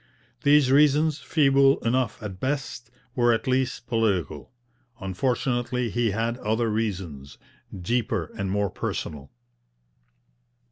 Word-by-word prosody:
These 145 Hz, -2 st, +4 dB
reasons, 150 Hz, +2 st, +4 dB
feeble 135 Hz, -2 st, +3 dB
enough 120 Hz, -2 st, 0 dB
at 95 Hz, -3 st, -6 dB
best, 135 Hz, -2 st, -3 dB, 0.3 s
were 120 Hz, -1 st, +3 dB
at 115 Hz, -, -2 dB
least 130 Hz, -1 st, 0 dB
political; 110 Hz, -, -1 dB, 0.5 s
unfortunately 120 Hz, +4 st, -1 dB
he 120 Hz, 0 st, +1 dB
had 115 Hz, +4 st, -2 dB
other 110 Hz, +1 st, 0 dB
reasons, 90 Hz, -11 st, -4 dB, 0.5 s
deeper 110 Hz, -5 st, -1 dB
and 100 Hz, -3 st, -3 dB
more 100 Hz, 0 st, 0 dB
personal. 70 Hz, -2 st, -5 dB
120 Hz, 105 wpm, -25 LUFS, 100-130 Hz, 0.5 s, These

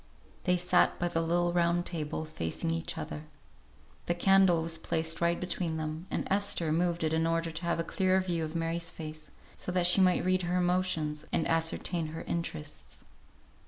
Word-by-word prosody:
They 180 Hz, 0 st, +3 dB
sat 180 Hz, 0 st, +3 dB
by 175 Hz, -, -1 dB
the 165 Hz, -, 0 dB
little 175 Hz, +1 st, +1 dB
round 175 Hz, 0 st, +2 dB
table, 160 Hz, -2 st, -3 dB
facing 155 Hz, -, -3 dB
each 165 Hz, 0 st, -2 dB
other. 150 Hz, -, -6 dB, 0.8 s
The 175 Hz, -, +1 dB
candle 190 Hz, -2 st, +4 dB
was 165 Hz, 0 st, -1 dB
placed 160 Hz, 0 st, -1 dB
right 170 Hz, 0 st, +2 dB
between 175 Hz, -3 st, -2 dB
them, 155 Hz, +3 st, -5 dB
and -, -, -2 dB
Esther 195 Hz, -5 st, +2 dB
moved 170 Hz, +1 st, 0 dB
it 160 Hz, 0 st, +1 dB
in 160 Hz, 0 st, +1 dB
order 165 Hz, 0 st, 0 dB
to 155 Hz, +1 st, -6 dB
have 170 Hz, 0 st, 0 dB
a -, -, +1 dB
clearer 185 Hz, +2 st, +1 dB
view 175 Hz, -3 st, -1 dB
of 155 Hz, +1 st, -5 dB
Mary's 165 Hz, 0 st, -1 dB
face, 155 Hz, -1 st, -8 dB, 0.3 s
so -, -, -4 dB
that 180 Hz, -1 st, +2 dB
she 180 Hz, +2 st, +6 dB
might 180 Hz, -1 st, +3 dB
read 185 Hz, 0 st, +2 dB
her 175 Hz, +1 st, -1 dB
emotions, 175 Hz, -4 st, 0 dB
and -, -, +1 dB
ascertain 165 Hz, +1 st, 0 dB
her 160 Hz, +1 st, -7 dB
interests. 150 Hz, -, -5 dB
170 Hz, 185 wpm, -30 LUFS, 160-180 Hz, 0.8 s, she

